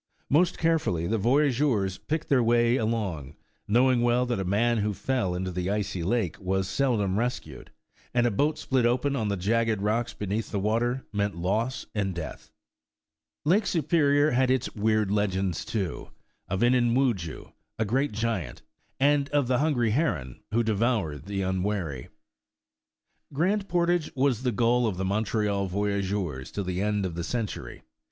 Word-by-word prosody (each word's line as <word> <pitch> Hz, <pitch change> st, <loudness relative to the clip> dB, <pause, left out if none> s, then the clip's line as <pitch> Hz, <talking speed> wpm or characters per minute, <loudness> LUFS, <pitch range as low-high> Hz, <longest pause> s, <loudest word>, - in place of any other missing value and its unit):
Most 170 Hz, +5 st, +3 dB
carefully 160 Hz, -, +1 dB
the 110 Hz, +5 st, 0 dB
voyageurs 125 Hz, -5 st, +2 dB
picked 160 Hz, +1 st, -3 dB
their 135 Hz, -3 st, +3 dB
way 120 Hz, +1 st, +3 dB
along, 100 Hz, -, -2 dB, 0.3 s
knowing 125 Hz, +3 st, +3 dB
well 120 Hz, +1 st, +2 dB
that 120 Hz, -4 st, -1 dB
a -, -, -1 dB
man 110 Hz, +5 st, +1 dB
who 105 Hz, -1 st, -1 dB
fell 120 Hz, -9 st, -1 dB
into 95 Hz, +1 st, -3 dB
the 90 Hz, +1 st, -2 dB
icy 100 Hz, -2 st, -2 dB
lake 95 Hz, -1 st, -1 dB
was 95 Hz, 0 st, -1 dB
seldom 105 Hz, -8 st, +1 dB
rescued, 115 Hz, -, -4 dB, 0.4 s
and 120 Hz, -1 st, +2 dB
a 120 Hz, -, +2 dB
boat 145 Hz, +9 st, +1 dB
split 130 Hz, -2 st, 0 dB
open 125 Hz, +4 st, +1 dB
on 110 Hz, -5 st, -1 dB
the 100 Hz, -1 st, -1 dB
jagged 110 Hz, +3 st, +1 dB
rocks 110 Hz, +4 st, 0 dB
beneath 105 Hz, +2 st, -3 dB
the 100 Hz, -, -2 dB
water, 120 Hz, +5 st, 0 dB
meant 100 Hz, 0 st, -1 dB
loss 110 Hz, +9 st, -1 dB
and 100 Hz, -4 st, -1 dB
death. 85 Hz, -3 st, -7 dB, 0.9 s
Lake 195 Hz, +7 st, +3 dB
Superior 150 Hz, -3 st, +3 dB
had 130 Hz, +1 st, +2 dB
its 130 Hz, -2 st, 0 dB
weird 110 Hz, -1 st, +1 dB
legends, 95 Hz, -4 st, 0 dB
too, 95 Hz, -8 st, -4 dB, 0.4 s
of 95 Hz, -, -2 dB
Inini 120 Hz, -1 st, +3 dB
Wudjoo, 110 Hz, -, -1 dB, 0.3 s
a 110 Hz, -, 0 dB
great 135 Hz, +7 st, 0 dB
giant, 110 Hz, -, -3 dB, 0.4 s
and 140 Hz, 0 st, +3 dB
of 145 Hz, -2 st, +2 dB
the 125 Hz, 0 st, +2 dB
hungry 130 Hz, -7 st, +1 dB
heron 85 Hz, -, -1 dB
who 115 Hz, +2 st, +2 dB
devoured 105 Hz, -, 0 dB
the 100 Hz, -1 st, -2 dB
unwary. 95 Hz, -7 st, -2 dB, 1.2 s
Grand 195 Hz, +8 st, 0 dB
Portage 175 Hz, -1 st, +1 dB
was 130 Hz, -3 st, +1 dB
the 125 Hz, -1 st, 0 dB
goal 120 Hz, +2 st, +2 dB
of 100 Hz, -5 st, -2 dB
the 95 Hz, -, -2 dB
Montreal 100 Hz, 0 st, 0 dB
voy 100 Hz, +2 st, -1 dB
ageurs 95 Hz, -9 st, -3 dB
till 100 Hz, -, -3 dB
the 90 Hz, 0 st, -2 dB
end 105 Hz, -1 st, 0 dB
of 90 Hz, -, -3 dB
the 85 Hz, +1 st, -4 dB
century. 115 Hz, +1 st, -4 dB
110 Hz, 160 wpm, -27 LUFS, 95-125 Hz, 1.2 s, Most